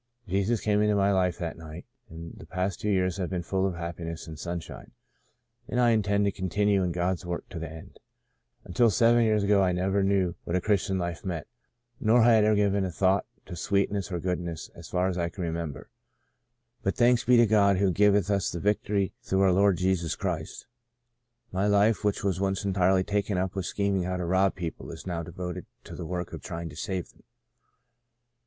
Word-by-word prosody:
Jesus 100 Hz, +5 st, 0 dB
came 105 Hz, -1 st, +2 dB
into 105 Hz, 0 st, +2 dB
my 100 Hz, 0 st, +3 dB
life 90 Hz, -2 st, +1 dB
that 85 Hz, -1 st, -5 dB
night, 80 Hz, +1 st, -9 dB, 0.2 s
and 85 Hz, -1 st, -9 dB
the -, -, -12 dB
past 90 Hz, +1 st, -2 dB
two 105 Hz, -, -1 dB
years 90 Hz, -3 st, +1 dB
have 90 Hz, -3 st, -2 dB
been 90 Hz, -2 st, -3 dB
full 95 Hz, +2 st, 0 dB
of 95 Hz, -, -3 dB
happiness 85 Hz, -1 st, -6 dB
and 80 Hz, -2 st, -9 dB
sunshine, 85 Hz, -2 st, -7 dB, 0.7 s
and 125 Hz, -, -1 dB
I 120 Hz, -1 st, +5 dB
intend 100 Hz, -2 st, +2 dB
to 100 Hz, -, +2 dB
continue 100 Hz, +2 st, +1 dB
in 90 Hz, -1 st, 0 dB
God's 90 Hz, +1 st, -1 dB
work 90 Hz, -1 st, -5 dB
to 85 Hz, -, -6 dB
the 80 Hz, -2 st, -5 dB
end. 80 Hz, 0 st, -12 dB, 0.6 s
Until 115 Hz, +7 st, +2 dB
seven 115 Hz, +2 st, +4 dB
years 110 Hz, -2 st, +2 dB
ago 100 Hz, 0 st, +4 dB
I 90 Hz, -1 st, +2 dB
never 95 Hz, +3 st, +1 dB
knew 95 Hz, -3 st, +1 dB
what 85 Hz, -, -3 dB
a -, -, +3 dB
Christian 100 Hz, -1 st, 0 dB
life 85 Hz, -2 st, -4 dB
meant, 85 Hz, -5 st, -4 dB, 0.5 s
nor 115 Hz, +2 st, +4 dB
had 115 Hz, -2 st, +5 dB
I -, -, +3 dB
ever 110 Hz, -, +4 dB
given 100 Hz, -1 st, +2 dB
a 95 Hz, -, -1 dB
thought 95 Hz, +3 st, +1 dB, 0.2 s
to -, -, -8 dB
sweetness 100 Hz, +2 st, -1 dB
or 90 Hz, -, -2 dB
goodness 85 Hz, -2 st, -3 dB
as 85 Hz, -1 st, -13 dB
far 90 Hz, +1 st, +1 dB
as 90 Hz, -1 st, -2 dB
I 85 Hz, 0 st, 0 dB
can 90 Hz, +1 st, -6 dB
remember. 80 Hz, -5 st, -5 dB, 0.4 s
* 120 Hz, 0 st, -50 dB
But 95 Hz, -, -1 dB
thanks 120 Hz, 0 st, +4 dB
be 125 Hz, +1 st, +5 dB
to 120 Hz, -, +6 dB
God 100 Hz, -3 st, +4 dB
who 95 Hz, 0 st, +2 dB
giveth 100 Hz, +1 st, +3 dB
us 100 Hz, -2 st, +1 dB
the 85 Hz, -, -4 dB
vic 105 Hz, +4 st, +1 dB
tory 100 Hz, -2 st, -1 dB
through 95 Hz, 0 st, 0 dB
our 95 Hz, -1 st, +5 dB
Lord 100 Hz, 0 st, +3 dB
Jesus 90 Hz, -3 st, 0 dB
Christ' -, -, -4 dB, 0.9 s
my 95 Hz, +2 st, 0 dB
life 105 Hz, +2 st, +3 dB
which 105 Hz, -1 st, 0 dB
once 95 Hz, -3 st, 0 dB
was 95 Hz, +1 st, -1 dB
entirely 95 Hz, -1 st, +3 dB
taken 100 Hz, 0 st, -1 dB
up 95 Hz, 0 st, -1 dB
with 95 Hz, -2 st, -3 dB
lo8 -, -, -3 dB
Sons -, -, -2 dB
of -, -, -8 dB
Ishmael -, -, -29 dB
scheming 95 Hz, -2 st, +1 dB
how 90 Hz, -, -1 dB
to 90 Hz, -, -3 dB
rob 95 Hz, +2 st, +2 dB
people 85 Hz, -3 st, -6 dB
is -, -, -9 dB
now 85 Hz, -3 st, -3 dB
devoted 90 Hz, +1 st, -6 dB, 0.2 s
to -, -, -11 dB
the 85 Hz, -, -6 dB
work 90 Hz, 0 st, -4 dB
of -, -, -7 dB
trying 85 Hz, 0 st, -6 dB
to 75 Hz, -, -12 dB
save 95 Hz, +1 st, -4 dB
them. -, -, -25 dB
95 Hz, 220 wpm, -27 LUFS, 85-100 Hz, 0.9 s, to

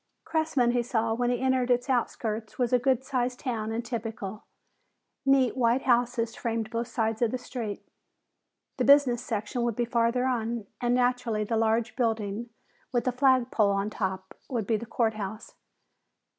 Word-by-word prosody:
Cressman, 315 Hz, -7 st, +1 dB
he 245 Hz, 0 st, +2 dB
saw 230 Hz, -2 st, 0 dB
when 245 Hz, +1 st, 0 dB
he 245 Hz, -1 st, 0 dB
entered 260 Hz, -1 st, +1 dB
its 245 Hz, +1 st, +2 dB
outskirts, 225 Hz, -3 st, -2 dB
was 245 Hz, -1 st, 0 dB
a 250 Hz, -, +5 dB
good 260 Hz, 0 st, +1 dB
sized 250 Hz, -2 st, -1 dB
town 225 Hz, -5 st, -3 dB
and 230 Hz, +1 st, -3 dB
typical. 220 Hz, -3 st, -5 dB, 0.8 s
Neat 270 Hz, -3 st, +4 dB
white 245 Hz, 0 st, +2 dB
houses 240 Hz, -2 st, +1 dB
framed 225 Hz, -1 st, -2 dB
both 230 Hz, 0 st, -2 dB
sides 225 Hz, -2 st, -1 dB
of 235 Hz, -, +3 dB
the 255 Hz, -, -2 dB
street. 240 Hz, -4 st, -6 dB, 0.9 s
The -, -, +1 dB
business 275 Hz, -4 st, +5 dB
section 220 Hz, +1 st, -3 dB
would 235 Hz, -2 st, 0 dB
be 240 Hz, -, 0 dB
farther 235 Hz, +1 st, +1 dB
on, 235 Hz, -3 st, -1 dB, 0.2 s
and 240 Hz, 0 st, +2 dB
naturally 245 Hz, -3 st, +1 dB
the 225 Hz, +2 st, -1 dB
large 225 Hz, 0 st, +1 dB
building 225 Hz, -2 st, -1 dB, 0.4 s
with 240 Hz, -1 st, 0 dB
a -, -, +3 dB
flag 255 Hz, -1 st, +3 dB
pole 210 Hz, -3 st, +3 dB
on 200 Hz, +1 st, 0 dB
top 190 Hz, -2 st, -3 dB, 0.2 s
would 235 Hz, -5 st, -1 dB
be 225 Hz, -, +1 dB
the 225 Hz, +2 st, -4 dB
court 225 Hz, -1 st, +1 dB
house. 215 Hz, +1 st, -6 dB
235 Hz, 170 wpm, -28 LUFS, 220-250 Hz, 0.9 s, a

